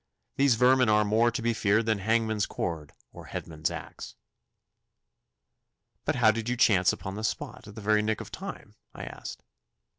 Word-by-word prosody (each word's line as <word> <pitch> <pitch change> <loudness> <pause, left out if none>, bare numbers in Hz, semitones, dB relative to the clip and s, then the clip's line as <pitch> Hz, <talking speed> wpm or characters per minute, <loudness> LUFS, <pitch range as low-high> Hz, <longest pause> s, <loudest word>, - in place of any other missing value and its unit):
These 140 -3 +4
vermin 125 0 +4
are 105 0 +4
more 110 +3 +3
to 115 -1 -4
be 120 0 +2
feared 110 0 +2
than 110 -2 +1
hangman's 110 0 +1
cord 80 -4 -4 0.2
or - - -11
headsman's 80 +1 -3
axe.' - - -8 1.9
'But - - 0
how 115 -3 +5
did 115 +1 -4
you 125 - -1
chance 95 -6 +4
upon 95 -1 -6
the 105 +2 -6
spot 110 - -4
at 105 - -11
the 110 - -8
very 105 +1 +3
nick 110 0 -1
of - - -9
time?' - - -8 0.2
I - - -7
asked. - - -8
110 Hz, 175 wpm, -28 LUFS, 105-115 Hz, 1.9 s, how